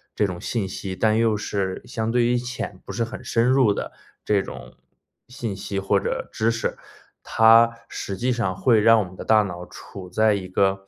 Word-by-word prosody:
这 105 - +2
种 90 -3 -5
信 110 -5 -2
息， 95 0 -5
但 110 +3 +2
又 115 -2 +2
是 95 -2 -3
相 110 0 -3
对 120 -1 +2
于 120 +1 +2
浅、 120 -6 -5
不 - - -8
是 115 - -1
很 115 - -7
深 115 0 +1
入 130 -4 +4
的 - - -4 0.3
这 105 -2 +2
种 - - -10 0.5
信 120 -6 -5
息 100 0 -4
或 100 +1 +2
者 - - -3
知 110 +1 +1
识， 115 0 -2 0.4
它 115 +1 +5 0.2
实 95 -2 -5
际 125 +4 0
上 115 -6 -1
会 110 +3 +4
让 115 +1 +6
我 - - -1
们 90 0 -11
的 - - -7
大 110 -1 +4
脑 90 -2 -6
处 95 -2 -11
在 110 +3 +3
一 95 -2 -3
个 95 +1 0
105 Hz, 220 characters per minute, -23 LUFS, 95-115 Hz, 0.5 s, 让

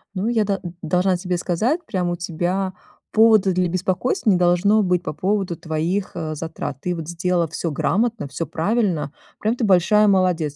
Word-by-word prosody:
Ну, 195 +4 -1
я 230 -3 +2
да 200 -1 -1 0.2
должна 180 +3 +1
тебе 180 -1 -2
сказать, 225 - -1
прям 180 -3 -1
у 175 - -1
тебя 180 +3 -2 0.4
повода 215 -3 +5
для 180 0 +1
беспокойства 185 +6 -1
не 185 - +4
должно 180 +4 +3
быть, 180 -1 +1
по - - -4
поводу 190 0 -1
твоих, 170 +5 -2
а, 160 -2 -3
затрат. 160 -4 -5
Ты 180 -1 -2
вот 160 -2 -6
сделала 175 0 0
всё 160 +2 -3
грамотно, 215 +4 0
всё 165 +4 -4
правильно. 180 -4 0 0.3
Прям 220 +3 0
ты 240 - -2
большая 210 +3 +4
молодец. 180 -6 +2
180 Hz, 175 wpm, -21 LUFS, 170-205 Hz, 0.4 s, повода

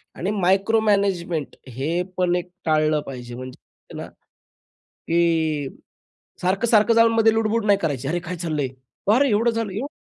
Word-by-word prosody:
आणि 190 +4 -2
मायक्रोमॅनेजमेंट 195 -4 +1 0.2
हे 165 +6 -1 0.2
पण 180 -1 +2
एक 180 0 -3 0.2
टाळलं 155 -1 +2
पाहिजे 120 -2 -7
म्हणजे 130 0 -12
ना, - - -6
की 160 -4 -3 0.7
सारखं-सारखं 215 +4 +3
जाऊन 230 0 +5
मध्ये 225 -1 +4
लुडबुड 225 0 0
नाही 200 -1 +4
करायची, 140 -5 -2
"अरे 175 +3 0
काय 180 - -3
चाललंय? 150 -5 -1 0.5
अरे 275 +2 +4
एवढं 225 +3 +2
झालं, 225 -3 -3
एवढं?" 245 +8 -3
180 Hz, 140 wpm, -22 LUFS, 155-220 Hz, 0.7 s, जाऊन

